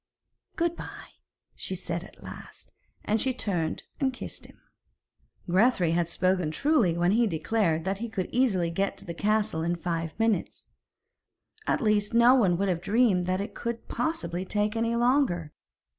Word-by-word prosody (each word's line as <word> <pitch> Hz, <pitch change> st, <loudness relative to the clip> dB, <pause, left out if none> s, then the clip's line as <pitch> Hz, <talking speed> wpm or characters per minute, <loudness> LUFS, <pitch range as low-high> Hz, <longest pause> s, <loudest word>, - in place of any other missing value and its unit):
'Good 340 Hz, 0 st, 0 dB
bye,' -, -, -10 dB, 0.3 s
she 190 Hz, -, -4 dB
said 170 Hz, -1 st, -4 dB
at -, -, -15 dB
last, -, -, -10 dB, 0.3 s
and 215 Hz, +1 st, +1 dB
she 260 Hz, -2 st, 0 dB
turned 180 Hz, -9 st, -2 dB, 0.2 s
and 270 Hz, -2 st, +2 dB
kissed 250 Hz, -, -8 dB
him. -, -, -19 dB, 0.9 s
Grethari 185 Hz, -2 st, +3 dB
had 170 Hz, 0 st, +1 dB
spoken 185 Hz, -2 st, +1 dB
truly 220 Hz, -, +2 dB
when 175 Hz, +1 st, +3 dB
he 230 Hz, +2 st, +3 dB
declared 165 Hz, -1 st, 0 dB
that 195 Hz, +1 st, -1 dB
he 235 Hz, +1 st, -4 dB
could 190 Hz, -5 st, -3 dB
easily 195 Hz, -10 st, +2 dB
get 195 Hz, +3 st, -1 dB
to -, -, -10 dB
the 170 Hz, -, -5 dB
castle 210 Hz, -2 st, 0 dB
in 170 Hz, +2 st, 0 dB
five 165 Hz, 0 st, -3 dB
minutes. 225 Hz, -5 st, -1 dB, 1.0 s
At -, -, +1 dB
least, 210 Hz, -1 st, +1 dB
no 235 Hz, +2 st, +7 dB
one 195 Hz, -10 st, +3 dB
would 200 Hz, +2 st, 0 dB
have 175 Hz, -3 st, 0 dB
dreamed 200 Hz, -3 st, +2 dB
that 185 Hz, +1 st, 0 dB
it 205 Hz, -, -5 dB
could 235 Hz, -1 st, -5 dB
possibly 185 Hz, -, -2 dB
take 210 Hz, +3 st, 0 dB
any 230 Hz, +1 st, 0 dB
longer. 240 Hz, -, +1 dB
200 Hz, 165 wpm, -27 LUFS, 175-230 Hz, 1.0 s, no